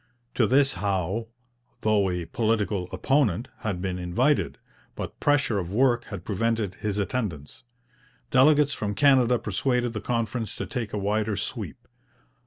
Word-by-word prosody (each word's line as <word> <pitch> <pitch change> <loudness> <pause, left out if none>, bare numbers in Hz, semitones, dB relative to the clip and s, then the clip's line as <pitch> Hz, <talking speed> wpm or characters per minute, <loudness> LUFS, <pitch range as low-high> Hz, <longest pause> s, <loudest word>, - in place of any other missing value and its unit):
To 115 - +3
this 135 +3 +4
Howe, 100 +3 -1 0.5
though 105 -3 +2
a 90 -1 -2
political 105 -4 0
opponent, 130 - +1
had 100 -6 -3
been 90 -1 -2
invited, 120 +12 +1 0.4
but - - -6
pressure 145 -8 +2
of 90 -1 -5
work 120 +1 +2
had 95 -4 -8
prevented 110 -1 0
his 105 -2 -1
attendance. 100 - -3 0.7
Delegates 145 +1 +5
from 105 -1 -3
Canada 130 -4 +5
persuaded 125 -1 -1
the 110 - -4
conference 115 -1 -2
to - - -4
take 120 -6 -4
a - - -3
wider 105 +1 0
sweep. - - -5
110 Hz, 140 wpm, -26 LUFS, 100-125 Hz, 0.7 s, Delegates